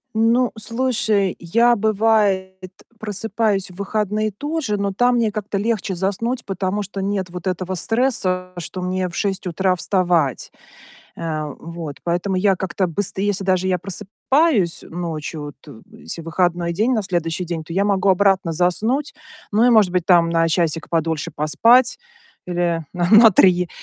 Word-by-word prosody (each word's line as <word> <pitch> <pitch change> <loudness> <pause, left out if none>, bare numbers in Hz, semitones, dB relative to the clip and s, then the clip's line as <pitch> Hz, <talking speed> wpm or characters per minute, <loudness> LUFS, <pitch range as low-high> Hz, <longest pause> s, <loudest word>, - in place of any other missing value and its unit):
Ну, 230 +3 +2
слушай, 220 -4 0
я, 230 +8 +3
бывает, 200 -3 +1 0.3
просыпаюсь 210 -1 -1
в - - -15
выходные 210 +1 -1
тоже, 290 +1 -3
но 200 0 -1
там 245 +5 +2
мне 230 -3 +1
как-то 205 -1 -4
легче 205 -2 -1
заснуть, 205 +7 -2
потому 195 +1 -2
что 195 0 -6
нет 195 -1 -2
вот 180 +1 -7
этого 185 0 -2
стресса, 185 -4 0
что 175 +2 -6
мне 185 0 -1
в 175 - -9
6 195 -2 -2
утра 185 +2 +1
вставать. 175 -6 0 0.7
Э, 155 -2 -3
вот, 165 -3 -8
поэтому 175 +3 -1
я 190 0 +2
как-то, 185 0 -2
быст 180 +4 -2
если 200 0 -1
даже 185 0 +1
я 180 -1 +1
просыпаюсь 210 - 0
ночью, 160 -3 -5
от 135 -5 -14
если - - -8
выходной 170 +1 0
день 220 +9 +1
на 220 -4 +1
следующий 175 -2 -2
день, 170 -2 -4
то 155 - -10
я 195 +3 +1
могу 200 -1 +1
обратно 190 -2 +3
заснуть. 215 - 0 0.4
Ну 215 +3 +3
и, 245 - +5
может 215 -6 +4
быть, 180 -2 0
там, 170 -2 +4
на 165 0 +2
часик 165 -1 0
подольше 160 -2 -1
поспать 230 - +3 0.5
или 175 -2 -1
на 175 -1 -1
на 225 +1 +8
3, 180 -2 +4
190 Hz, 155 wpm, -20 LUFS, 175-215 Hz, 0.7 s, на